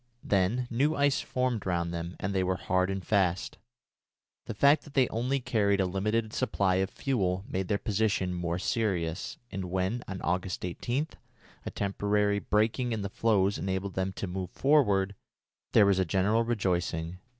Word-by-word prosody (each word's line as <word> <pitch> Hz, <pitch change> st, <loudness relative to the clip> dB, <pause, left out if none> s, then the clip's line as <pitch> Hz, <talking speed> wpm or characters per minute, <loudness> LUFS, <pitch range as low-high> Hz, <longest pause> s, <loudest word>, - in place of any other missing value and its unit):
Then 105 Hz, +6 st, +1 dB
new 140 Hz, +7 st, +2 dB
ice 140 Hz, -1 st, +2 dB
formed 125 Hz, -3 st, -1 dB
round 85 Hz, -2 st, -1 dB
them, 85 Hz, +1 st, -4 dB
and 95 Hz, +2 st, -2 dB
they 95 Hz, -1 st, +1 dB
were 95 Hz, 0 st, 0 dB
hard 95 Hz, +1 st, 0 dB
and 95 Hz, -1 st, -3 dB
fast. 95 Hz, -4 st, 0 dB, 0.9 s
The -, -, -4 dB
fact 140 Hz, +2 st, +5 dB
that 145 Hz, -, -15 dB
they 130 Hz, -3 st, +4 dB
only 125 Hz, +5 st, 0 dB
carried 105 Hz, -5 st, +1 dB
a 95 Hz, -, +3 dB
limited 105 Hz, +4 st, -1 dB
supply 100 Hz, -7 st, +1 dB
of 95 Hz, 0 st, +1 dB
fuel 95 Hz, -8 st, -1 dB
made 95 Hz, 0 st, -2 dB
their 100 Hz, -, +1 dB
position 100 Hz, -3 st, 0 dB
more 85 Hz, -1 st, -2 dB
serious, 95 Hz, 0 st, -1 dB
and 95 Hz, -1 st, -4 dB
when, 95 Hz, +6 st, -1 dB
on 95 Hz, -1 st, -5 dB
August 90 Hz, +2 st, -1 dB
18, 120 Hz, -, -2 dB, 0.6 s
a -, -, 0 dB
temporary 100 Hz, +1 st, 0 dB
breaking 110 Hz, +4 st, +1 dB
in 110 Hz, -2 st, -2 dB
the 100 Hz, -, -3 dB
floes 100 Hz, -3 st, +2 dB
enabled 95 Hz, 0 st, -2 dB
them 95 Hz, 0 st, -1 dB
to 100 Hz, -, -4 dB
move 90 Hz, -1 st, -4 dB
forward, 105 Hz, -8 st, +3 dB, 0.6 s
there 105 Hz, -, +6 dB
was 100 Hz, -1 st, +3 dB
a -, -, +4 dB
general 100 Hz, +6 st, +2 dB
rejoicing. 90 Hz, -6 st, -1 dB
100 Hz, 170 wpm, -29 LUFS, 95-115 Hz, 0.9 s, there